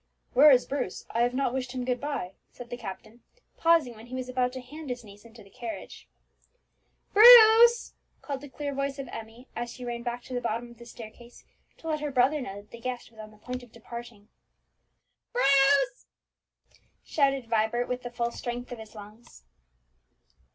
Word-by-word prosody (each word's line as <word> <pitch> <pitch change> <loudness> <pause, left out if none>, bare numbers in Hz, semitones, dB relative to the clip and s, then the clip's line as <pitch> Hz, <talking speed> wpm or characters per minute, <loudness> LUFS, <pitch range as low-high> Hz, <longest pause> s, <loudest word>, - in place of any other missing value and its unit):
"Where 285 +4 +8
is 255 -3 +5
Bruce? 260 -9 -4
I 230 - 0
have 245 +1 +1
not 270 -2 0
wished 255 -1 -3
him 250 -1 -4
good 250 -1 -1
bye," 280 -11 -4 0.2
said 245 0 -12
the - - -3
captain, 220 +1 -9 0.4
pausing 330 -7 +3
when 220 +2 -13
he 255 - -7
was 255 -1 -5
about 250 0 0
to 260 - -6
hand 290 +4 -10
his 245 -1 -5
niece 205 +1 -15
into 230 -1 -15
the 195 - -20
carriage. 235 -2 -8 1.0
"Bruce!" 465 +1 +8 0.3
called 280 -2 -5
the 290 - -10
clear 285 +1 -5
voice 275 0 -2
of 275 - -6
Emmie, 225 +3 -10
as 240 0 -4
she 250 +1 -9
ran 240 -1 -4
back 240 0 -4
to 255 - -10
the 245 - -2
bottom 235 +1 -3
of 235 - -17
the 235 - -12
staircase 235 +1 -13 0.3
to 325 - -11
let 310 -1 -1
her 295 0 -3
brother 275 +3 +2
know 200 -4 -7
that - - -30
the 235 - -10
guest 250 -1 -5
was 220 - -19
on 215 0 -9
the 215 - -19
point 250 +4 -6
of 245 -2 -16
departing. 235 -2 -10 1.1
"Bruce!" 280 - +3 1.0
shouted 275 -4 +1
Vibert 225 +2 0
with 250 0 -3
the 245 - -6
full 235 0 -2
strength 245 +1 -6
of 245 - -7
his 220 0 -12
lungs. 210 - -14
245 Hz, 195 wpm, -27 LUFS, 235-275 Hz, 1.1 s, Where